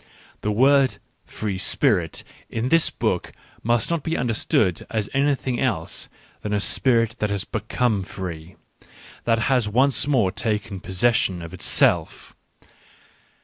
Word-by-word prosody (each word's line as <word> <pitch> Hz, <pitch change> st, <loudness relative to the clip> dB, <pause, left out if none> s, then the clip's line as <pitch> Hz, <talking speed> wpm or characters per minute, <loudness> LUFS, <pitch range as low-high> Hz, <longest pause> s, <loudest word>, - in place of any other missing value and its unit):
The 105 Hz, -, -1 dB
word 135 Hz, +4 st, +4 dB, 0.2 s
" -, -, -44 dB
free 100 Hz, -3 st, -2 dB
spirit -, -, +1 dB
" -, -, -27 dB
in 115 Hz, +3 st, 0 dB
this 165 Hz, +1 st, +4 dB
book -, -, -2 dB, 0.3 s
must 120 Hz, +6 st, +1 dB
not 170 Hz, -2 st, 0 dB
be 165 Hz, +3 st, -2 dB
understood 110 Hz, -6 st, +1 dB
as 110 Hz, -3 st, -2 dB
anything 135 Hz, -2 st, 0 dB
else 100 Hz, -12 st, -2 dB, 0.3 s
than 105 Hz, -, -4 dB
a -, -, +1 dB
spirit 115 Hz, +1 st, +2 dB
that 105 Hz, -, 0 dB
has 100 Hz, -1 st, -1 dB
become 110 Hz, 0 st, -1 dB
free, 90 Hz, -2 st, -7 dB, 0.7 s
that 115 Hz, -1 st, +3 dB
has 120 Hz, -1 st, +1 dB
once 130 Hz, +4 st, +3 dB
more 120 Hz, -10 st, +2 dB
taken 105 Hz, -1 st, -3 dB
possession 95 Hz, -2 st, 0 dB
of 85 Hz, -, -9 dB
itself. -, -, +2 dB
110 Hz, 140 wpm, -23 LUFS, 100-130 Hz, 0.7 s, word